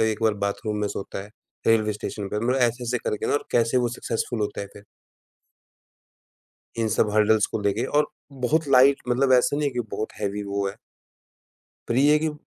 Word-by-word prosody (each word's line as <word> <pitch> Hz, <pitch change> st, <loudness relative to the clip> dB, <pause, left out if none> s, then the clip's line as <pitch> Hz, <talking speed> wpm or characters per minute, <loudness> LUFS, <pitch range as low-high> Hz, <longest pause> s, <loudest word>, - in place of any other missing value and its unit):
एक 110 Hz, +1 st, -3 dB
बार 110 Hz, -2 st, +3 dB
बाथरूम 100 Hz, +1 st, -2 dB
में 105 Hz, -, 0 dB
सोता 95 Hz, -1 st, -5 dB
है, 100 Hz, -, -13 dB, 0.4 s
रेलवे 110 Hz, -1 st, +3 dB
स्टेशन 105 Hz, -1 st, -5 dB
पे, 105 Hz, -, -2 dB
मतलब 125 Hz, +3 st, +1 dB
ऐसे, 120 Hz, -1 st, +1 dB
ऐसे 125 Hz, +1 st, -1 dB
करके 105 Hz, -, -3 dB
ना -, -, 0 dB
और 145 Hz, -, -1 dB
कैसे 115 Hz, +1 st, +2 dB
वो 120 Hz, -1 st, +1 dB
सक्सेसफुल 115 Hz, -1 st, -3 dB
होता 105 Hz, -1 st, -2 dB
है 100 Hz, -, -5 dB
फिर 100 Hz, -, -13 dB, 1.9 s
इन 115 Hz, -1 st, 0 dB
सब 105 Hz, 0 st, +1 dB
हर्डल्स 110 Hz, 0 st, +4 dB
को -, -, -4 dB
लेके 100 Hz, +3 st, 0 dB
और 150 Hz, -, +3 dB, 0.4 s
बहुत 155 Hz, +3 st, +1 dB
लाइट 135 Hz, +1 st, +5 dB
मतलब 130 Hz, +2 st, +2 dB
ऐसा 125 Hz, +3 st, +4 dB
नहीं 145 Hz, -1 st, +1 dB
है -, -, -7 dB
कि 125 Hz, -, 0 dB
बहुत 110 Hz, -, -4 dB
हेवी 105 Hz, 0 st, -2 dB
वो 100 Hz, 0 st, -2 dB
है 100 Hz, -, -8 dB, 1.1 s
पर 115 Hz, -, 0 dB
ये 145 Hz, +3 st, +5 dB
है 150 Hz, -, +5 dB
कि 160 Hz, -, -1 dB
अ 155 Hz, -, -1 dB
115 Hz, 205 wpm, -24 LUFS, 105-125 Hz, 1.9 s, लाइट